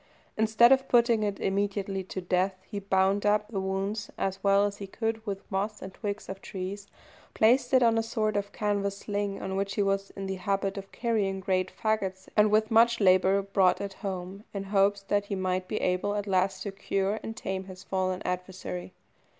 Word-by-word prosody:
Instead 220 +3 +5
of 265 0 +4
putting 235 -2 +4
it 205 -2 -1
immediately 195 0 -1
to 185 0 -6
death, 185 +2 +1
he 205 - -4
bound 195 0 +2
up 210 0 +2
the 205 -4 -2
wounds 195 +3 -2
as 195 0 -2
well 200 0 +4
as 205 0 -3
he 200 - -7
could 225 +2 -3
with 195 -1 -3
moss 205 +2 -1
and 190 0 -8
twigs 205 -1 -4
of 190 0 -7
trees, 195 +1 -6 0.5
placed 245 +3 +4
it 260 -2 +5
on 225 -1 +4
a - - +2
sort 215 -1 -1
of 205 0 -1
canvas 200 -1 -1
sling 205 -1 -3
on 190 - -4
which 195 0 -2
he 205 - +2
was 195 0 0
in 195 - -5
the 190 0 -3
habit 195 0 0
of 195 -1 -8
carrying 210 -5 0
great 185 -1 0
fagots, 195 -4 -2
and 210 0 +5
with 215 +1 +2
much 235 +1 +5
labour 190 0 +4
brought 195 -2 +3
it 200 -1 -4
home, 190 0 -6
in 195 - -2
hopes 200 0 +2
that 205 +1 0
he 200 - -3
might 185 -1 -1
be 215 - -2
able 185 +3 0
at 205 -1 -2
last 190 -1 +1
to 200 - -4
cure 195 +1 -1
and 225 - -6
tame 190 0 -3
his 185 -1 -10
fallen 185 -1 -1
adversary. 175 - -4
195 Hz, 200 wpm, -28 LUFS, 190-210 Hz, 0.5 s, Instead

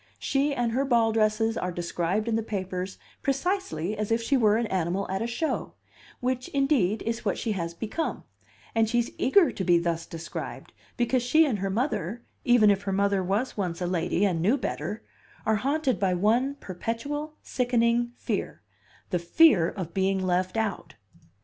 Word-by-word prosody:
She 280 +2 +1
and 245 -4 0
her 260 +4 +1
ball 235 -4 +3
dresses 220 +1 +2
are 180 - -2
described 175 +4 -1
in 230 - +1
the 225 - +1
papers 190 -3 -4 0.2
precisely 275 - -1
as 210 +1 -3
if 225 - +3
she 230 +4 +1
were 215 -4 +4
an 235 - 0
animal 185 0 -1
at 190 - -1
a 230 - -1
show 240 +7 -2 0.5
which 255 0 -1
indeed 270 -8 +1
is 230 +1 -3
what 200 - 0
she 225 - -2
has 170 -4 -3
become; 225 - -3 0.5
and 225 -1 +2
she's 240 0 +1
eager 340 +6 +5
to 190 - -4
be 175 -2 +4
thus 170 -1 -1
described, 165 0 -7 0.2
because 245 +1 +2
she 310 +7 +4
and 235 -9 -1
her 195 +1 -1
mother 230 - -2 0.2
even 240 -4 +6
if 200 -1 +1
her 200 -1 -3
mother 200 0 +1
was 205 +8 -1
once 180 -4 -2
a 180 - -1
lady 175 +2 +1
and 175 -5 0
knew 215 +11 +3
better 205 - -4 0.4
are 220 -1 +3
haunted 270 - 0
by 185 -2 +2
one 235 +9 +2
perpetual, 285 - -4
sickening 240 -1 +1
fear, - - -4 0.5
the 180 - +1
fear 175 - +5
of 175 -4 -6
being 195 0 +1
left 185 +2 0
out. 200 -8 -2
215 Hz, 175 wpm, -27 LUFS, 185-245 Hz, 0.5 s, even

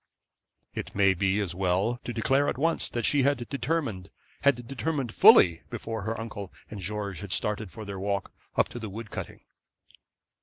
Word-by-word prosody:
It - - -6
may 100 -1 +5
be 95 +2 +1
as 95 -4 -1
well 95 +6 +1
to - - -3
declare 135 +5 +2
at - - -2
once 165 +4 +1
that 120 -1 -2
she 145 - +3
had 140 +1 +3
determined 140 - -2 0.3
had 125 -4 +3
determined 135 -1 -2
fully, 85 -2 +7
before 115 -1 -4
her 110 +3 -3
uncle 100 -4 -6 0.2
and 105 - -6
George 100 -1 -4
had 100 -2 -7
started 105 0 -1
for 110 +3 -8
their 100 -1 -6
walk 100 0 -2 0.2
up - - +3
to 120 - -7
the 110 -2 -5
wood 110 +2 -8
cutting. - - -6
110 Hz, 180 wpm, -28 LUFS, 100-125 Hz, 0.3 s, fully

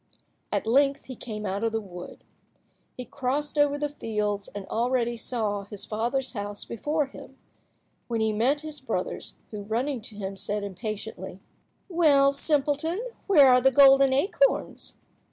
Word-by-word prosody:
At - - -1
length 275 +4 +3
he 260 - -8
came 215 -3 -6
out 200 +2 -2
of 225 - +1
the 225 - 0
wood. 180 -4 -10 0.7
He 250 - -5
crossed 280 +5 -2
over 290 -1 +3
the 295 0 -1
fields, 210 -7 -2
and 200 0 -7
already 240 +1 0
saw 220 -4 -2
his 200 0 -6
father's 240 +5 -1
house 205 -2 -5
before 295 +6 -1
him, 270 -1 -13 0.7
when 230 -2 -1
he 220 -1 +1
met 260 +7 +2
his 310 -1 -6
brothers, - - -3 0.2
who, 210 -2 -5
running 235 +5 -2
to 215 0 -7
him, 195 -1 -5
said 205 +1 -2
impatiently— 200 -1 -6 0.5
"Well, 295 -6 +4
simpleton, 300 - 0 0.2
where 295 -9 +7
are 250 0 +6
the 265 - +5
golden 270 0 +7
acorns?" 395 - +1
245 Hz, 155 wpm, -27 LUFS, 210-280 Hz, 0.7 s, where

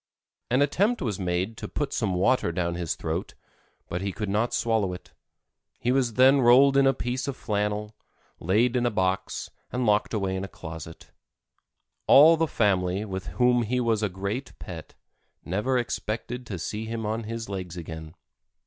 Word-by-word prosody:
An 130 +4 +4
attempt 200 - +1
was 105 -6 -2
made 90 +4 -1
to - - -6
put 145 - -3
some 100 -6 0
water 100 +1 +2
down 85 0 -1
his 85 -2 -2
throat, - - -4 0.5
but 85 - -3
he 100 0 -2
could 105 +1 -4
not 110 +4 +1
swallow 110 -5 +1
it. 90 - -11 0.7
He 125 - 0
was 125 -4 +1
then 130 +2 +6
rolled 130 +3 +6
in 135 0 +5
a 135 - +4
piece 125 +2 -3
of 140 - -3
flannel, 105 0 -2 0.4
laid 110 +8 +2
in 120 -1 +2
a - - +3
box 95 -3 -1 0.2
and 125 0 -1
locked 105 +1 +2
away 95 -2 -1
in 95 - -3
a - - -4
closet. 80 -2 -10 1.0
All 155 +4 +8
the 165 0 +1
family, 95 -4 +1
with 95 -2 -5
whom 125 -1 +4
he 120 +3 0
was 115 -3 +1
a 105 - 0
great 100 +8 -5
pet, - - -9 0.5
never 105 +9 0
expected 120 +1 -3
to 95 - -4
see 105 +6 -4
him 115 0 -4
on 110 +1 -2
his 115 +1 -5
legs 95 -3 -5
again. 80 -1 -8
110 Hz, 175 wpm, -26 LUFS, 95-125 Hz, 1.0 s, All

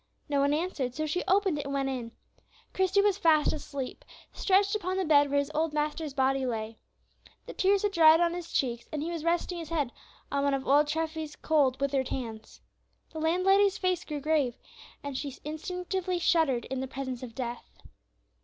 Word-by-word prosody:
No 285 -1 +1
one 280 +1 +3
answered, 295 -6 -2
so 310 - -1
she 310 +4 -1
opened 385 -5 +2
it 285 - -4
and 280 0 -3
went 275 -1 0
in. 250 -4 -4 0.6
Christie 380 +1 +2
was 405 -1 +2
fast 315 -5 +4
asleep, 280 -3 -6 0.3
stretched 395 +1 +2
upon 375 -2 -2
the 380 - 0
bed 290 -2 +5
where 285 - +1
his 285 +1 0
old 315 0 0
master's 300 -1 -2
body 270 0 +2
lay. 225 -3 -3 0.7
The - - -8
tears 390 +1 +2
had 415 - +1
dried 325 -3 +7
on 345 0 +2
his 350 -1 -6
cheeks, 240 -3 -1
and 300 -1 -3
he 335 - -3
was 330 -3 -4
resting 345 +1 0
his 325 -2 -7
head 295 -7 -1 0.4
on 280 0 0
one 280 -1 +2
of 265 -1 -5
old 290 +2 +5
Treffy's 315 0 -3
cold, 275 -5 +2
withered 275 -2 0
hands. 225 -4 -6 0.5
The 320 - -5
landlady's 380 +5 +3
face 365 -2 0
grew 295 -2 -5
grave, 295 -5 +1 0.5
and 285 -1 -5
she 275 0 -4
instinctively 360 +3 -3
shuddered 320 -8 +2
in 265 - -4
the 265 - -3
presence 260 -2 -5
of 240 -3 -8
death. 240 -2 -6
300 Hz, 190 wpm, -29 LUFS, 270-345 Hz, 0.7 s, dried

